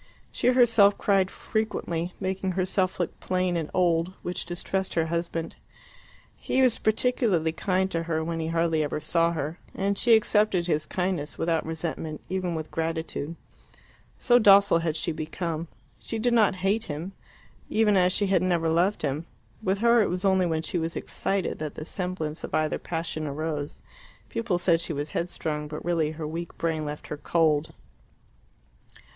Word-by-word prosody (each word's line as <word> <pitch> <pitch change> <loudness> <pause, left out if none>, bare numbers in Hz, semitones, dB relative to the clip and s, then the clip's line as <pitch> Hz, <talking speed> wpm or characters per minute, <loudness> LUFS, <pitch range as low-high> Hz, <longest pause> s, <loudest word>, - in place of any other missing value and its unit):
She - - -1
herself 230 -5 +5
cried 195 -2 +2
frequently, 180 -7 -3
making 190 0 -2
herself 185 0 0
look 175 - -2
plain 185 -1 0
and 160 -3 -2
old, 175 0 +1
which 175 - -4
distressed 190 +2 -3
her 165 -1 +2
husband. 170 -1 -2 0.8
He 265 - +1
was 250 -3 +3
particularly 215 - +2
kind 190 +3 0
to 165 - 0
her 160 -1 -1
when 165 0 -3
he 160 - -2
hardly 165 -1 +1
ever 150 0 -2
saw 165 +2 +1
her, 155 +1 -4 0.2
and 200 +1 0
she 235 -2 +6
accepted 210 -4 +2
his 155 -3 0
kindness 180 -5 -2
without 165 -1 0
resentment, 160 -1 -4
even 185 -2 -1
with 160 -1 -5
gratitude, 160 -1 -3 0.8
so 245 -1 +4
docile 200 -4 +6
had 165 -2 -1
she 165 - -1
become. 160 +1 -4 0.3
She 225 - -4
did 240 +2 +2
not 215 -4 +4
hate 215 +3 +2
him, 160 +3 -5 0.6
even 215 -2 +3
as 180 -1 +4
she 205 - +1
had 190 -1 +2
never 170 -3 +1
loved 175 +5 +1
him; 150 +3 -2 0.3
with 195 -2 0
her 235 +2 +5
it 210 - +1
was 180 +2 -2
only 190 -2 +3
when 160 -1 -1
she 175 - -2
was 165 +1 -3
excited 195 -2 -2
that 155 -1 -4
the 155 - -6
semblance 175 -4 -3
of - - -3
either 155 -1 0
passion 165 -2 -3
arose. 150 0 -4 0.5
People 225 -6 -1
said 175 -2 +2
she 170 - -3
was 145 +1 -4
headstrong, 155 -3 -3
but 150 +1 -7
really 165 -3 +1
her 155 0 -6
weak 165 +2 -6
brain 160 -2 -1
left 150 0 -6
her 150 - -4
cold. 155 -1 +1
170 Hz, 170 wpm, -26 LUFS, 160-190 Hz, 0.8 s, she